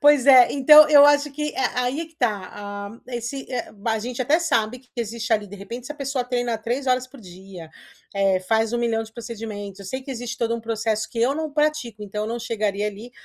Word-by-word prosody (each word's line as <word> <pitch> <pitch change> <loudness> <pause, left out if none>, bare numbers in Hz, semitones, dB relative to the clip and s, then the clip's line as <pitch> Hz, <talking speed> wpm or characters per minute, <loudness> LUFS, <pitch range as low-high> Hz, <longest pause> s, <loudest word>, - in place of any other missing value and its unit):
Pois 290 -3 +5
é. 255 -3 +8
Então, 300 +2 +8
eu 290 -1 +8
acho 290 0 +4
que 300 +1 -3
é, 265 - -1
aí 250 +5 -1
é 330 - -4
que 325 - -24
tá, 210 -8 -1
ah, 205 +2 -8
esse 245 +3 -5
é 245 -2 -4
b 215 +2 -4
a 220 - 0
gente 245 +3 -4
até 290 +6 +3
sabe 250 -8 0
que 250 - -26
existe 230 0 -3
ali, 210 -2 +1
de 205 - -10
repente, 235 +5 -8
se 300 - -5
a - - -16
pessoa 275 -3 -3
treina 245 -2 -1
3 240 +5 -3
horas 255 0 +1
por 265 -1 -15
dia, 185 -2 -12 0.5
eh, 195 -1 +2
faz 225 +4 0
um 240 - 0
milhão 230 -1 0
de 220 0 -12
procedimentos 215 -4 -7
eu 200 - -10
sei 260 +7 -4
que 270 - -9
existe 245 -1 -5
todo 230 0 0
um 235 - -4
processo 220 -1 -2
que 230 - -7
eu 260 +4 +2
não 315 -1 -4
pratico, 300 -8 -1
então, 210 +1 -4
eu - - -4
não 235 +1 -3
chegaria 210 -3 -2
ali, 210 +4 -7
235 Hz, 245 wpm, -23 LUFS, 215-265 Hz, 0.5 s, é